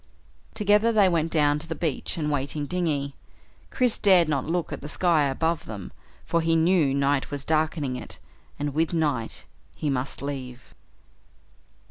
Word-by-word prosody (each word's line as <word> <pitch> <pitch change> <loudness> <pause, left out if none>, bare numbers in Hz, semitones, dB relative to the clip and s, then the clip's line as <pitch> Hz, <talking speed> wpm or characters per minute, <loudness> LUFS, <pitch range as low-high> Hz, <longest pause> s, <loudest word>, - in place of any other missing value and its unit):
Together 210 +1 +3
they 210 -3 +5
went 165 -2 +1
down 150 -2 +3
to 165 - -8
the 160 - -4
beach 160 -2 -2
and 155 -2 -1
the 150 - 0
waiting 145 +1 -1
dinghy. 145 -5 -1 0.6
Chris 250 -3 +2
dared 185 -5 +5
not 140 -4 0
look 165 -2 -1
at 145 - -6
the 145 - -7
sky 165 -3 +2
above 160 +4 -1
them 100 -4 -7 0.3
for 170 - +1
he 165 0 +2
knew 165 -3 +3
night 140 0 +1
was 145 -1 -5
darkening 155 -4 0
it, - - -9 0.4
and 145 0 -3
with 160 +2 +1
the 170 - -2
night 140 -8 -1 0.3
he 150 - -2
must 135 +1 -3
leave. 130 -3 -6
155 Hz, 170 wpm, -25 LUFS, 140-170 Hz, 0.6 s, they